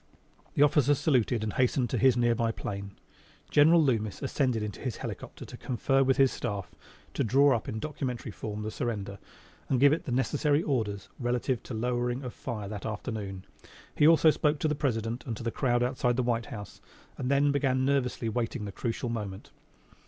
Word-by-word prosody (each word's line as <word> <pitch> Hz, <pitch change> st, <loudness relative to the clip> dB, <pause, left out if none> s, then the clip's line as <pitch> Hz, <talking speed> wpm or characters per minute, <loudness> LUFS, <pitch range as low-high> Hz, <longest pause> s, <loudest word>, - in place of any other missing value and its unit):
The 145 Hz, -, +5 dB
officer 145 Hz, -1 st, +4 dB
saluted 125 Hz, -5 st, +1 dB
and 110 Hz, -, -2 dB
hastened 125 Hz, -1 st, +1 dB
to -, -, 0 dB
his 130 Hz, -2 st, +4 dB
near 120 Hz, -1 st, +3 dB
by 115 Hz, 0 st, 0 dB
plane. 100 Hz, -2 st, -6 dB, 0.6 s
General 160 Hz, +3 st, +6 dB
Loomis 110 Hz, -6 st, 0 dB
ascended 130 Hz, -5 st, 0 dB
into 105 Hz, -2 st, -6 dB
his 125 Hz, -6 st, -3 dB
helicopter -, -, -7 dB
to -, -, -10 dB
confer 135 Hz, +2 st, +1 dB
with 135 Hz, 0 st, +2 dB
his 135 Hz, -1 st, +5 dB
staff 100 Hz, -6 st, -4 dB, 0.4 s
to -, -, 0 dB
draw 135 Hz, +4 st, +4 dB
up 115 Hz, -, -4 dB
in 110 Hz, -, -4 dB
documentary 125 Hz, -3 st, -4 dB
form 105 Hz, 0 st, -5 dB
the 110 Hz, -, -3 dB
surrender, 100 Hz, -4 st, -4 dB, 0.5 s
and 130 Hz, -, +2 dB
give 145 Hz, +5 st, +4 dB
the 150 Hz, -, -5 dB
necessary 145 Hz, +5 st, +1 dB
orders 110 Hz, -8 st, -2 dB
relative 125 Hz, 0 st, -1 dB
to 120 Hz, -, -7 dB
lowering 120 Hz, +2 st, -1 dB
of 125 Hz, -, -6 dB
fire 110 Hz, -5 st, -5 dB
that 105 Hz, +1 st, -5 dB
afternoon. 105 Hz, -3 st, -5 dB, 0.5 s
He 150 Hz, -, +4 dB
also 160 Hz, -1 st, +6 dB
spoke 150 Hz, 0 st, +1 dB
to -, -, +2 dB
the 150 Hz, -, +1 dB
President 120 Hz, -5 st, -2 dB
and 115 Hz, -3 st, -3 dB
to -, -, -7 dB
the 115 Hz, -, -1 dB
crowd 120 Hz, -2 st, +1 dB
outside 125 Hz, -1 st, +1 dB
the 130 Hz, -, +1 dB
White 120 Hz, -1 st, 0 dB
House, 105 Hz, -8 st, -9 dB, 0.4 s
and 125 Hz, -, -2 dB
then 140 Hz, +1 st, +3 dB
began 130 Hz, -2 st, +1 dB
nervously 130 Hz, -4 st, 0 dB
waiting 115 Hz, 0 st, -2 dB
the 100 Hz, -, -5 dB
crucial 115 Hz, +3 st, -3 dB
moment. 105 Hz, -4 st, -5 dB
120 Hz, 190 wpm, -29 LUFS, 110-135 Hz, 0.6 s, General